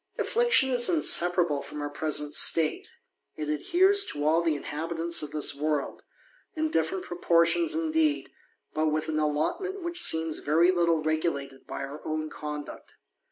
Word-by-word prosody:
Affliction 475 - +2
is 245 -1 +2
inseparable 175 - +3
from 150 - -9
our 145 - -3
present 150 -1 -2
state; 160 -2 +2 0.5
it 150 -1 -5
adhere 350 - +2
to 400 - +2
all 160 +2 +3
the 165 -2 0
inhabitants 165 +3 -2
of 150 - -5
this 150 -1 +1
world, 150 0 -3 0.5
in 315 0 -2
different 165 +4 -1
proportioi 175 - +1
indeed, 320 -2 0 0.4
but 155 0 0
with 155 0 -2
an 155 -1 -1
allotment 345 - -2
which 345 +1 0
seems 160 -1 +2
very 165 +5 +3
litt 170 -3 0
regulated 155 -4 -3
by - - -6
our 140 +2 -8
own 155 0 -4
conduct. 150 -1 -8
160 Hz, 150 wpm, -27 LUFS, 150-250 Hz, 0.5 s, inseparable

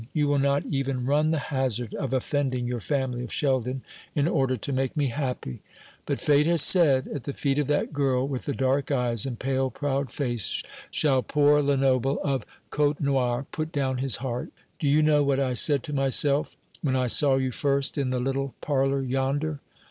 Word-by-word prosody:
You 150 -2 +1
will 145 -1 +2
not 140 +1 +1
even 135 -2 -2
run 150 +3 +2
the 160 - +1 0.2
hazard 125 -4 -1
of 135 -3 -3
offending 130 -1 -1
your 120 0 -2
family 130 0 -2
of 120 - -7
Sheldon 130 -2 -1 0.3
in 145 +1 +2
order 135 -6 +1
to 135 +5 -4
make 130 +2 -1
me 145 -3 +1
happy. 125 - -4 0.5
But - - -1
Fate 150 +1 +3
has 170 -3 +4
said, 145 -8 +5
'At 145 -5 -6
the 140 - -4
feet 140 0 0
of 145 - 0
that 145 +1 0
girl 135 -2 +1
with 135 -3 -4
the 140 - -2
dark 135 +1 0
eyes 125 -4 +1
and 125 -3 -5
pale 130 +1 -1
proud 140 -1 -2
face 120 - -3 0.3
shall 135 -4 +2
poor 145 +2 +3
Lenoble 135 -1 +1
of 135 -6 -2 0.2
Côtenoir 140 -4 0
put 155 0 -4
down 135 -4 -1
his 130 -3 +1
heart.' 125 -1 -4 0.3
Do 155 - -1
you 150 +2 +4
know 150 -1 +4
what 140 -1 +1
I 130 -2 0
said 140 +1 +3
to 150 - -6
myself 140 +1 +2 0.2
when 135 -4 0
I 130 -1 +1
saw 135 +3 +4
you 130 -1 0
first 140 +2 0
in 140 -3 -1
the 130 0 -1
little 135 +1 -2
parlour 135 -1 0
yonder? 135 +4 -1
135 Hz, 195 wpm, -26 LUFS, 130-145 Hz, 0.5 s, said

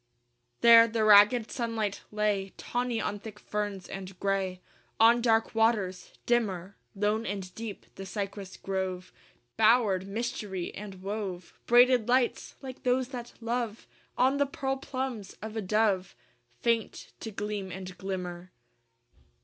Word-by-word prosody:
I 120 0 -47 0.3
There 230 -1 +9
the 225 -1 0
ragged 215 +2 +6
sunlight 225 -4 -2
lay 210 -2 0
Tawny 245 -1 -2
on 205 -1 -2
thick 210 0 -9
ferns 205 -3 -4
and 190 -1 -8
gray 195 -2 -1 0.4
On 230 +2 +6
dark 225 -1 +2
waters: 220 -5 +1
dimmer, 200 -6 0 0.2
Lone 210 +2 +1
and 195 -3 -5
deep, 220 0 -7
the 195 - -8
cypress 200 -1 -5
grove 190 -1 -3 0.4
Bowered 215 -4 +4
mystery 200 -4 -4
and 195 -2 -9
wove 195 -4 -4
Braided 245 -1 +6
lights, 250 0 +1
like 260 -1 -8
those 250 0 +1
that 240 -2 -7
love 230 -1 -2 0.3
On 260 +3 +3
the 285 0 +2
pearl 270 -1 -2
plumes 260 -6 -5
of 220 +1 -7
a 220 - -1
dove 200 -2 +1 0.5
Faint 230 -1 -1
to 225 - -5
gleam 205 -2 -4
and 185 0 -7
glimmer. 180 -2 -5
210 Hz, 135 wpm, -29 LUFS, 190-235 Hz, 0.5 s, There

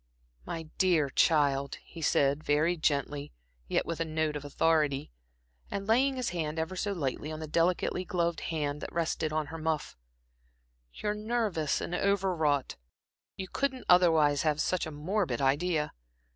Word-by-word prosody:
"My 165 - -4 0.2
dear 165 -7 +3
child," 140 -2 +2
he 165 - -11
said, 140 0 +2
very 155 +4 +2
gently, 145 -2 -1 0.4
yet - - +1
with 165 - -4
a - - +2
note 155 -1 -1
of 145 - -4
authority, 145 - +1 0.6
and 195 0 -3
laying 260 +5 +3
his 255 -2 -1
hand 160 -3 -3
ever 160 +3 -2
so 205 +2 -1
lightly 150 -3 -3
on 155 - -5
the 160 - -4
delicately 170 +3 +1
gloved 170 -2 -1
hand 150 -3 -2
that - - -6
rested 160 -2 -1
on 155 0 0
her 165 - -5
muff 160 -1 -2 1.0
"you're 210 - -2
nervous 210 -8 -1
and - - -4
over 195 0 +1
wrought. 145 -4 0 0.6
You 190 - -5
couldn't 265 +3 -2
otherwise 160 -5 +5
have 155 -2 +1
such 180 0 0
a - - -6
morbid 155 - -1
idea. 150 +3 +1
160 Hz, 160 wpm, -30 LUFS, 150-180 Hz, 1.0 s, otherwise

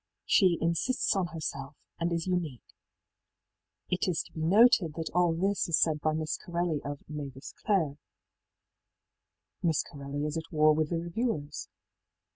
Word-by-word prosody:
She 185 -5 +4
ìinsists 170 +10 +1
on 190 -2 +1
herself,î 145 -3 -5 0.2
and 170 +1 0
is 170 -1 -1
unique,í 175 -9 -2 1.3
It 180 +3 +1
is 175 -3 0
to - - -18
be 160 - -5
noted 185 -2 +5
that 165 -1 -4
all 180 -1 +4
this 190 +3 0
is 165 - +4
said 155 -2 +2
by 155 +1 +1
Miss 155 0 -2
Corelli 170 -3 -1
of 145 +1 -4
ëMavis 140 -3 -7
Clare,í 160 -9 0 1.6
Miss 160 -3 +2
Corelli 140 +1 -5
is 150 +1 -2
at 160 0 -6
war 155 -1 +5
with 155 0 0
the 170 - 0
reviewers. 170 -4 -3
165 Hz, 150 wpm, -30 LUFS, 150-175 Hz, 1.6 s, noted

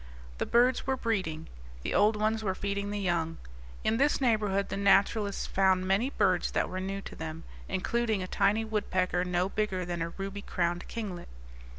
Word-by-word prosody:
The - - -1
birds 245 +3 +3
were 265 0 +1
breeding; 185 -10 -2 0.4
the - - -2
old 210 +1 +4
ones 215 +1 0
were 190 -2 0
feeding 200 +1 -2
the 205 - -2
young. 170 -4 -1 0.5
In 225 - +2
this 285 +3 +3
neighborhood 210 -6 +1
the - - -3
naturalists 200 +1 +3
found 190 -1 +2
many 200 +7 +2
birds 185 -10 +2
that - - +1
were 185 - -4
new 195 +1 -3
to - - -9
them, 160 0 -6 0.3
including 215 +1 0
a - - -5
tiny 205 +4 +2
woodpecker 185 -4 0
no 180 0 0
bigger 195 -3 -1
than 175 -1 -3
a 165 - -1
ruby 195 +3 -6
crowned 175 -2 -1
kinglet. 200 -7 -5
195 Hz, 180 wpm, -30 LUFS, 185-215 Hz, 0.5 s, old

